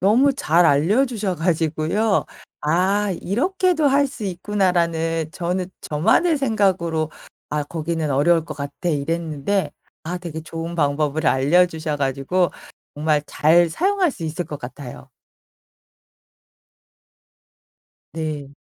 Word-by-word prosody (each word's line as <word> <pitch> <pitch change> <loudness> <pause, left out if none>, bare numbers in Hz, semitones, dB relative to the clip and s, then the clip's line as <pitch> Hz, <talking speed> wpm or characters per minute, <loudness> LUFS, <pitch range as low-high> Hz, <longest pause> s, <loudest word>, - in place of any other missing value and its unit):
너무 240 +9 +4
잘 175 - +2
알려주셔 200 - +2
가지고요. 165 +5 0 0.4
'아. 190 +6 +1
이렇게도 350 - +1
할 280 +1 +3
수 260 -5 -8
있구나.'라는 170 -4 0
저는 180 0 -2
저만의 225 - +2
생각으로 185 - +1 0.4
'아 150 0 -1
거기는 160 +1 -3
어려울 155 +4 +3
것 - - -7
같아.' 140 +4 -4
이랬는데 165 +4 -1 0.3
아 175 +3 -3
되게 170 -3 -6
좋은 165 +1 -6
방법을 150 +1 0
알려주셔 155 +2 +2
가지고 140 +6 0 0.4
정말 150 0 +1
잘 170 +3 +4
사용할 375 - +1
수 215 - -10
있을 160 +3 -3
것 150 -2 -7
같아요. 130 0 -9 3.0
네. 150 -3 -5
170 Hz, 240 characters per minute, -21 LUFS, 155-200 Hz, 3.0 s, 너무